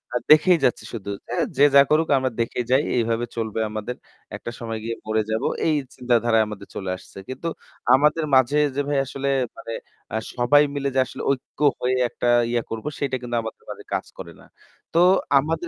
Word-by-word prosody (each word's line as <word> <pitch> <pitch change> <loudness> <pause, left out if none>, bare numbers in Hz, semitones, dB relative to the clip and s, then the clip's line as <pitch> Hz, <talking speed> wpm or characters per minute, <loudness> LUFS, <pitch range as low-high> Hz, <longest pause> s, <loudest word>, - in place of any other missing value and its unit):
আ - - +4
দেখেই 170 +3 +7
যাচ্ছি 125 - +1
শুধু 100 -3 -6 0.2
এ - - -1 0.2
যে 145 - +7
যা 140 - +10
করুক 155 +1 +3
আমরা 130 -1 0
দেখেই 120 +1 -2
যাই। 135 +3 +4
এইভাবে 115 0 0
চলবে 110 -1 -3
আমাদের। 110 +3 -5 0.4
একটা 120 - -7
সময় 115 -2 -4
গিয়ে 115 0 -3
মরে 110 0 +1
যাব 110 +4 -1 0.2
এই 155 - +3 0.2
চিন্তাধারায় 120 -3 +2
আমাদের 105 -1 -8
চলে 95 -2 -4
আসছে। 95 - -16
কিন্তু 130 +6 -5 0.5
আমাদের 150 +3 +2
মাঝে 130 +3 +4 0.2
যে 145 - +1
ভাই 145 -1 0
আসলে 140 +1 -3 0.3
মানে 115 -4 -7 0.4
আ - - +1 0.2
সবাই 130 +4 +5
মিলে 140 -1 -1
যে - - +4
আসলে - - -8
ঐক্য 135 +1 -5 0.2
হয়ে 130 +1 +1
একটা 120 - -3 0.2
ইয়া 120 -1 0
করব 115 +3 -5
সেটা 140 -2 -1
কিন্তু 120 -1 -4
আমাদের 110 - -8
মাঝে - - -8
কাজ - - -1
করে - - -8
না। - - -17 0.5
তো 165 - +3 0.4
আমাদের 160 +4 -2
125 Hz, 190 wpm, -23 LUFS, 115-140 Hz, 0.5 s, যা